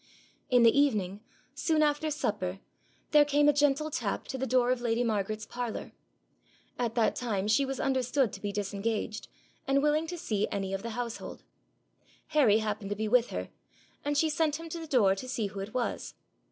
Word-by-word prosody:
In 245 -3 +5
the 230 - +6
evening, 210 -9 +2 0.3
soon 310 +2 +2
after 300 +1 +1
supper, 200 -10 -2 0.5
there 300 -1 +7
came 290 0 +3
a 295 - +6
gentle 290 +1 +2
tap 220 -7 -2
to 265 - -3
the 265 - -1
door 250 -1 +3
of 255 -1 0
lady 235 0 +1
Margaret's 215 -1 -1
parlour. 240 -2 -5 0.9
At 235 -2 -1
that 230 -2 +2
time 210 -5 -2
she 245 +6 +3
was 270 0 -4
understood 260 -2 +1
to - - -8
be 205 - -2
disengaged, 210 +2 -3 0.4
and 275 +1 +3
willing 305 +2 +2
to 350 +1 -5
see 215 - -1
any 195 -1 -2
of 195 - -2
the 230 - -5
household. 235 -2 -5 0.9
Harry 270 -9 +5
happened 215 -2 -3
to 205 - -1
be 215 +1 -2
with 240 +2 +3
her, - - -5 0.5
and 290 0 0
she 320 - +4
sent 310 -1 0
him 330 0 -8
to 335 - -5
the 325 - -7
door 230 -10 +4
to 225 +7 -7
see 230 -4 -1
who 200 0 -5
it 200 +4 -6
was. 245 -2 -2
245 Hz, 195 wpm, -30 LUFS, 210-290 Hz, 0.9 s, there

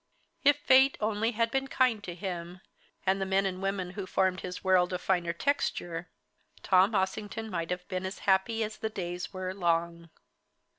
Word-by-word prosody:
If 290 0 +6
fate 265 -1 +5
only 220 +2 0
had 230 +1 +1
been 270 0 0
kind 250 -6 +2
to 175 - -6
him, 180 0 -6 0.4
and 195 +1 +2
the - - +1
men 195 +1 +2
and 185 -1 -3
women 195 -2 -2
who 190 -1 -6
formed 185 -1 +1
his 180 -1 -6
world 185 -1 +3
of 180 - -1
finer 175 -3 +1
texture, 175 - -2 0.5
Tom 190 +3 +4
Ossington 205 +3 -2
might 170 -2 -3
have 180 0 -4
been 185 -1 -3
as 190 - -6
happy 200 +4 +2
as 215 0 -5
the 220 - -3
days 180 -3 -5
were 185 -1 -4
long. 170 -2 -1
190 Hz, 180 wpm, -29 LUFS, 180-215 Hz, 0.5 s, If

